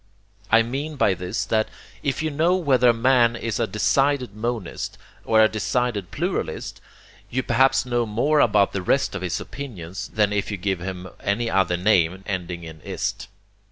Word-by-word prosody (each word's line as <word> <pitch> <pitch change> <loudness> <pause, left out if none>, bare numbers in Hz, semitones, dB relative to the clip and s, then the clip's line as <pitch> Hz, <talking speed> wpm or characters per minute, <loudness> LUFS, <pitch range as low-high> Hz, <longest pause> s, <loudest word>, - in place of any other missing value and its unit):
I 115 +1 +6
mean 140 +6 -4
by 105 -8 +3
this 95 +2 -3
that 110 +1 +1 0.3
if 140 +2 -1
you 155 - -1
know 165 +5 +2
whether 130 -9 +3
a - - +8
man 120 0 +3
is 115 -1 -3
a 115 - +1
decided 125 +3 +1
monist 110 -4 -4 0.3
or 110 -1 +5
a - - +6
decided 110 -2 -1
pluralist, - - -3 0.5
you 130 +1 -1
perhaps 135 +3 +3
know 120 -2 0
more 140 +8 +2
about 105 -6 +4
the 95 - -2
rest 135 +9 +1
of 100 - -4
his 90 -2 -2
opinions 100 -8 -7
than 105 -1 +2
if 105 0 -1
you 105 - -3
give 95 0 -1
him 90 +1 -6
any 115 +3 -1
other 95 -2 +2
name 90 -1 +2
ending 90 -3 -4
in 80 -1 -10
IST. 100 +1 -3
110 Hz, 175 wpm, -23 LUFS, 95-125 Hz, 0.5 s, a